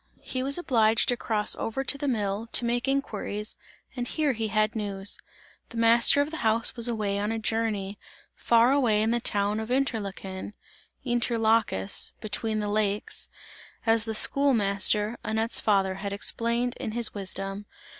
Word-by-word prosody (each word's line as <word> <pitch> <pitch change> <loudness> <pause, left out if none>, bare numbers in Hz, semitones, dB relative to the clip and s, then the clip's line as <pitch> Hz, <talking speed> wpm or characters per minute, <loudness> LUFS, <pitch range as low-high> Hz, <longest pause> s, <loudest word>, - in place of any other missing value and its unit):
He 255 - -3
was 275 +3 +1
obliged 225 -9 +2
to 245 - +3
cross 215 -3 0
over 245 +4 -3
to 275 - 0
the 285 +1 -4
mill, 210 -3 -1
to 240 - +4
make 240 +2 -1
inquiries, 215 -6 -2 0.4
and 245 -1 -3
here 305 0 0
he 225 -1 -2
had 215 +2 0
news. 200 -2 -1 0.5
The 235 - -8
master 230 +4 +6
of 290 +2 -2
the 320 - -5
house 225 -1 +1
was 235 -1 +1
away 210 -4 -1
on 210 +2 -1
a 225 - -2
journey, 215 -3 -2 0.3
far 235 +2 +3
away 235 -7 +3
in 220 - +1
the 240 - +1
town 205 -1 0
of 220 +1 -5
Interlaken 205 -7 -3 0.5
inter 240 -1 +1
lacus, 220 - 0
"between 215 0 -2
the 210 - -2
lakes" 205 0 -1 0.6
as 225 -1 +3
the 220 -1 -3
school 275 +4 +3
master, 210 +2 +1
Annette's 220 +1 +1
father, 195 -3 +2
had 200 +1 -5
explained, 235 +4 -1
in 215 - -4
his 235 -1 0
wisdom. 195 0 -4
220 Hz, 165 wpm, -27 LUFS, 205-240 Hz, 0.6 s, master